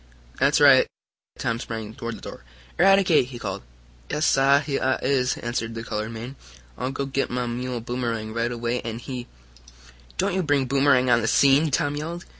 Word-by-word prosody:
"That's -, -, +3 dB
right." -, -, +7 dB, 0.5 s
Tom 115 Hz, -, -2 dB
sprang 110 Hz, -3 st, -6 dB
toward 115 Hz, 0 st, -6 dB
the -, -, -15 dB
door. -, -, -9 dB, 0.4 s
"Eradicate!" 190 Hz, -7 st, +5 dB
he 125 Hz, -2 st, -8 dB
called. -, -, -5 dB, 0.5 s
"Yais, 150 Hz, -, 0 dB
sah! 135 Hz, +1 st, +4 dB
Heah 135 Hz, -3 st, 0 dB
I -, -, -6 dB
is!" 130 Hz, -1 st, +1 dB
answered 115 Hz, -1 st, -3 dB
the 115 Hz, -, -5 dB
colored 110 Hz, -1 st, -4 dB
man. 115 Hz, +4 st, -7 dB, 0.4 s
"I'll 125 Hz, -, -3 dB
go 135 Hz, +1 st, -3 dB
git 135 Hz, 0 st, -1 dB
mah 125 Hz, 0 st, -2 dB
mule, 120 Hz, 0 st, -4 dB
Boomerang, 115 Hz, -2 st, -3 dB
right 115 Hz, +1 st, -1 dB
away, 120 Hz, +1 st, -2 dB
an' 115 Hz, -1 st, -5 dB
he 125 Hz, 0 st, -7 dB, 0.4 s
" -, -, -24 dB
"Don't -, -, 0 dB
you 190 Hz, -, +1 dB
bring 145 Hz, -5 st, +1 dB
Boomerang 130 Hz, -1 st, +3 dB
on 120 Hz, -1 st, +4 dB
the 115 Hz, -, -1 dB
scene!" 140 Hz, +5 st, +4 dB
Tom 145 Hz, +1 st, 0 dB
yelled. 165 Hz, +4 st, -5 dB
125 Hz, 190 wpm, -24 LUFS, 115-140 Hz, 0.5 s, right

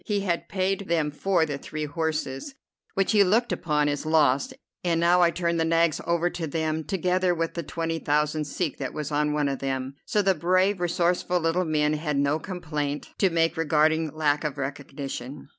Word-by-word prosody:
He 205 Hz, -3 st, -1 dB
had 175 Hz, -3 st, -2 dB
paid 195 Hz, +1 st, -1 dB
them 160 Hz, -3 st, +1 dB
for 175 Hz, +2 st, +1 dB
the 145 Hz, -3 st, -4 dB
three 155 Hz, +1 st, -5 dB
horses, 155 Hz, -, -3 dB, 0.4 s
which 195 Hz, -1 st, +2 dB
he 210 Hz, -2 st, +6 dB
looked 220 Hz, +6 st, +2 dB
upon 150 Hz, -3 st, +1 dB
as 145 Hz, 0 st, -1 dB
lost, 155 Hz, -, +3 dB, 0.3 s
and 170 Hz, -2 st, +1 dB
now 175 Hz, +1 st, +4 dB
I 175 Hz, -, +6 dB
turned 170 Hz, -1 st, -1 dB
the -, -, +3 dB
nags 165 Hz, -1 st, +2 dB
over 170 Hz, 0 st, +2 dB
to 165 Hz, -2 st, -4 dB
them, 160 Hz, +1 st, -1 dB
together 185 Hz, 0 st, +1 dB
with 165 Hz, 0 st, -2 dB
the 170 Hz, -, -3 dB
twenty 165 Hz, -1 st, -3 dB
thousand 150 Hz, +1 st, 0 dB
sek 150 Hz, +1 st, -3 dB
that 135 Hz, -, -4 dB
was 150 Hz, -1 st, -4 dB
on 150 Hz, 0 st, +1 dB
one 150 Hz, -1 st, +1 dB
of 135 Hz, -1 st, -2 dB
them; 135 Hz, 0 st, -3 dB
so 210 Hz, -, +2 dB
the 195 Hz, 0 st, +4 dB
brave, 185 Hz, +2 st, +2 dB
resourceful 175 Hz, +1 st, +1 dB
little 165 Hz, +2 st, +1 dB
men 150 Hz, -1 st, +1 dB
had 150 Hz, -1 st, -2 dB
no 140 Hz, +2 st, +2 dB
complaint 150 Hz, -5 st, -4 dB
to 195 Hz, -, +4 dB
make 165 Hz, 0 st, +1 dB
regarding 160 Hz, 0 st, +2 dB
lack 150 Hz, -1 st, +1 dB
of 150 Hz, -2 st, -3 dB
recognition. 140 Hz, -1 st, -6 dB
160 Hz, 195 wpm, -26 LUFS, 150-175 Hz, 0.4 s, he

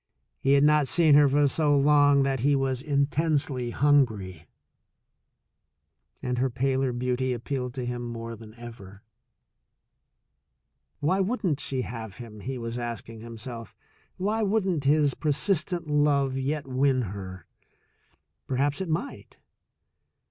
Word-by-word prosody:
He 135 Hz, -, +2 dB
had 140 Hz, 0 st, +5 dB
not 150 Hz, -1 st, +4 dB
seen 160 Hz, -1 st, +4 dB
her 145 Hz, -1 st, +6 dB
for 145 Hz, +1 st, +3 dB
so 145 Hz, +1 st, +2 dB
long 145 Hz, 0 st, +4 dB
that 135 Hz, -1 st, 0 dB
he 140 Hz, +4 st, +2 dB
was 135 Hz, -2 st, 0 dB
intensely 140 Hz, -3 st, 0 dB
hungry, 110 Hz, -, +1 dB, 1.8 s
and 125 Hz, -1 st, -2 dB
her 130 Hz, +1 st, +1 dB
paler 130 Hz, +1 st, 0 dB
beauty 125 Hz, +1 st, -1 dB
appealed 125 Hz, +1 st, -4 dB
to 130 Hz, -2 st, -3 dB
him 120 Hz, 0 st, -4 dB
more 115 Hz, -1 st, -6 dB
than 110 Hz, 0 st, -13 dB
ever. 115 Hz, -5 st, -12 dB, 2.0 s
Why 160 Hz, +7 st, +1 dB
wouldn't 190 Hz, -, 0 dB
she 130 Hz, -3 st, -2 dB
have 110 Hz, -4 st, -7 dB
him? 115 Hz, -4 st, -10 dB
he 130 Hz, +5 st, -5 dB
was 115 Hz, 0 st, -5 dB
ask 120 Hz, -1 st, -5 dB
ing 115 Hz, -1 st, -10 dB
himself. 115 Hz, 0 st, -8 dB, 0.4 s
Why 210 Hz, +4 st, -1 dB
wouldn't 195 Hz, -8 st, 0 dB
his 145 Hz, -1 st, +3 dB
persistent 165 Hz, +4 st, 0 dB
love 145 Hz, -2 st, +2 dB
yet 140 Hz, +3 st, -2 dB
win 130 Hz, 0 st, +1 dB
her? 95 Hz, -3 st, -8 dB, 1.0 s
Perhaps 140 Hz, +4 st, 0 dB
it 185 Hz, -, -4 dB
might. 170 Hz, -, -4 dB
135 Hz, 130 wpm, -26 LUFS, 120-145 Hz, 2.0 s, her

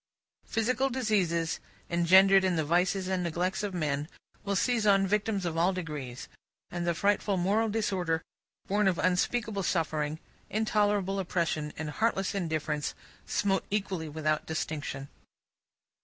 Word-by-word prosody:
Physical 255 Hz, +4 st, +1 dB
diseases, 195 Hz, -10 st, 0 dB, 0.3 s
engendered 190 Hz, +3 st, +6 dB
in 185 Hz, -2 st, +2 dB
the 160 Hz, -2 st, 0 dB
vices 180 Hz, +4 st, +1 dB
and 185 Hz, -1 st, 0 dB
neglects 175 Hz, +3 st, -1 dB
of 205 Hz, -3 st, -3 dB
men, 150 Hz, -3 st, -1 dB, 0.4 s
will 200 Hz, 0 st, -1 dB
seize 225 Hz, +1 st, +1 dB
on 195 Hz, -1 st, +5 dB
victims 205 Hz, -1 st, 0 dB
of 165 Hz, -1 st, -2 dB
all 175 Hz, +3 st, +3 dB
degrees; 150 Hz, -8 st, -5 dB, 0.4 s
and 175 Hz, 0 st, -3 dB
the 170 Hz, -, +1 dB
frightful 200 Hz, +1 st, +1 dB
moral 205 Hz, +5 st, +2 dB
disorder, 185 Hz, -6 st, 0 dB, 0.4 s
born 205 Hz, +1 st, +2 dB
of 185 Hz, -3 st, +2 dB
unspeakable 200 Hz, +3 st, +1 dB
suffering, 155 Hz, -4 st, -1 dB, 0.3 s
intolerable 205 Hz, -2 st, +1 dB
oppression, 170 Hz, -4 st, -1 dB
and 155 Hz, -1 st, -4 dB
heartless 195 Hz, 0 st, 0 dB
indifference, 155 Hz, -5 st, -2 dB, 0.3 s
smote 195 Hz, -2 st, +1 dB
equally 195 Hz, -6 st, -2 dB
without 155 Hz, 0 st, -1 dB
distinction. 150 Hz, -3 st, -3 dB
185 Hz, 130 wpm, -29 LUFS, 160-205 Hz, 0.4 s, engendered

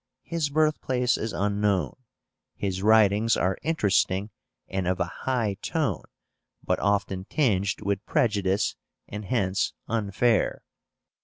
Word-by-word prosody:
His 165 Hz, -4 st, -2 dB
birthplace 140 Hz, -5 st, +1 dB
is 110 Hz, -, -3 dB
unknown. 100 Hz, -4 st, 0 dB, 0.6 s
His 95 Hz, -2 st, -3 dB
writings 110 Hz, +1 st, +4 dB
are 95 Hz, +2 st, 0 dB
interesting 105 Hz, -, +1 dB, 0.4 s
and 95 Hz, -2 st, -2 dB
of 90 Hz, 0 st, 0 dB
a 90 Hz, -, +2 dB, 0.2 s
high 110 Hz, -6 st, 0 dB
tone, 145 Hz, -, -1 dB, 0.6 s
but -, -, 0 dB
often 100 Hz, -2 st, 0 dB
tinged 100 Hz, -10 st, 0 dB
with 100 Hz, 0 st, -1 dB
prejudice, 100 Hz, -3 st, +1 dB, 0.3 s
and 105 Hz, +1 st, -6 dB
hence 100 Hz, -5 st, 0 dB
unfair. 110 Hz, +1 st, +1 dB
105 Hz, 110 wpm, -26 LUFS, 95-120 Hz, 0.6 s, writings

